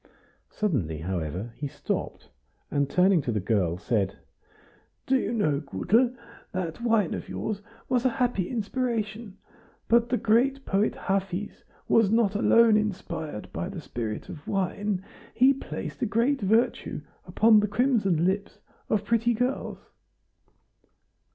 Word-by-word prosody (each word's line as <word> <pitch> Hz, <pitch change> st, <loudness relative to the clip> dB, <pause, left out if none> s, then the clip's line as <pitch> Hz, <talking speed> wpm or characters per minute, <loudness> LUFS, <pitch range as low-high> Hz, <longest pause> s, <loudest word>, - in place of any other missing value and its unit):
Suddenly, 120 Hz, -, -1 dB
however, 90 Hz, +5 st, -3 dB
he 145 Hz, -, -3 dB
stopped, -, -, -4 dB, 0.4 s
and 140 Hz, -1 st, +1 dB
turning 185 Hz, -2 st, +4 dB
to 125 Hz, -, -2 dB
the 105 Hz, -, 0 dB
girl, 95 Hz, -4 st, 0 dB
said: 100 Hz, 0 st, -1 dB, 0.9 s
"Do 265 Hz, -, +2 dB
you 235 Hz, -4 st, 0 dB
know, 155 Hz, -12 st, +1 dB
Gutel, 220 Hz, -, +1 dB, 0.4 s
that 180 Hz, 0 st, -3 dB
wine 225 Hz, -7 st, +2 dB
of -, -, -6 dB
yours 210 Hz, -2 st, -3 dB, 0.3 s
was 250 Hz, -2 st, +1 dB
a 260 Hz, -, +4 dB
happy 240 Hz, -8 st, 0 dB
inspiration, 225 Hz, -3 st, -3 dB, 0.5 s
but 235 Hz, 0 st, +4 dB
the 250 Hz, -, +2 dB
great 260 Hz, +5 st, +2 dB
poet 200 Hz, +2 st, +1 dB
Hafiz 195 Hz, 0 st, -3 dB, 0.2 s
was 225 Hz, -3 st, +4 dB
not 220 Hz, -2 st, +3 dB
alone 225 Hz, +1 st, +5 dB
inspired 175 Hz, -, -4 dB
by -, -, -3 dB
the -, -, -6 dB
spirit 110 Hz, -3 st, -5 dB
of 165 Hz, -5 st, -10 dB
wine, 195 Hz, 0 st, -1 dB, 0.3 s
he 260 Hz, +3 st, +6 dB
placed 270 Hz, -, -7 dB
a 240 Hz, -, +1 dB
great 235 Hz, +6 st, +1 dB
virtue 220 Hz, +5 st, +1 dB, 0.3 s
upon 220 Hz, 0 st, +5 dB
the 210 Hz, -, +1 dB
crimson 205 Hz, -, +2 dB
lips 200 Hz, +2 st, -1 dB, 0.3 s
of 210 Hz, -1 st, +1 dB
pretty 235 Hz, +1 st, +2 dB
girls." 250 Hz, +4 st, -2 dB
205 Hz, 135 wpm, -27 LUFS, 160-235 Hz, 0.9 s, he